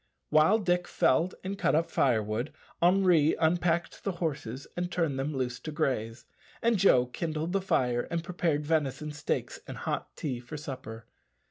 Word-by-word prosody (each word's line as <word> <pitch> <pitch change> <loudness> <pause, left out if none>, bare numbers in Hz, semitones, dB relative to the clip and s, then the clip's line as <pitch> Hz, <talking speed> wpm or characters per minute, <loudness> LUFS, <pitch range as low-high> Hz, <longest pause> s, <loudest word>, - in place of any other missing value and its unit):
While 155 +8 +5
Dick 180 -4 0
Varley - - +3 0.2
felled 185 - -13
and 195 +1 -4
cut - - +2
up 165 +1 +1
firewood, 115 0 +1 0.3
Henri 175 -4 +4
unpacked 170 +1 +1
the 195 - -1
horses 140 -7 -4
and 175 0 -2
turned 160 -6 0
them 140 +3 -1
loose 125 -1 -2
to 155 - -6
graze, 120 -6 -2 0.3
and 230 -3 +2
Joe 130 -10 +5
kindled 155 +5 -3
the 195 - +2
fire 125 -9 +1
and 170 -1 -2
prepared 165 -4 -1
venison 150 -1 0
steaks 145 0 -3
and - - -7
hot - - -3
tea 130 -5 -3
for 125 +5 -8
supper. 125 -6 -7
155 Hz, 165 wpm, -29 LUFS, 130-175 Hz, 0.3 s, While